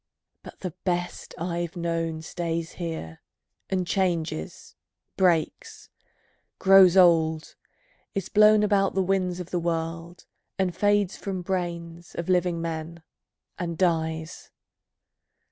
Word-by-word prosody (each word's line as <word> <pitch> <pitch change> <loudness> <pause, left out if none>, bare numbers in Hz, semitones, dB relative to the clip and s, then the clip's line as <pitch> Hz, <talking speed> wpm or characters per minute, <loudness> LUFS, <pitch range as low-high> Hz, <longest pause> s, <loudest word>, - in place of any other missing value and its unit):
But - - -13
the 185 -4 -4
best 175 -1 -3
I've 170 0 -3
known, 165 -2 -2
Stays 165 0 -3
here, 160 - -6 0.5
and 185 -2 0
changes, 170 - -2 0.4
breaks, 175 -4 0 0.7
grows 190 -1 +7
old, 160 -3 +4 0.6
is 195 -2 -2
blown 210 0 +5
About 200 -2 +2
the 190 - +2
winds 185 -1 0
of 180 0 -7
the 175 - 0
world, 165 +1 -4 0.3
and 185 -3 0
fades 205 -1 +2
from 190 -2 -4
brains 170 -2 -4
Of 170 +1 -4
living 180 -2 +2
men, 165 0 -5 0.6
and 170 -2 -3
dies. 160 -2 -1
175 Hz, 110 wpm, -26 LUFS, 165-185 Hz, 0.7 s, grows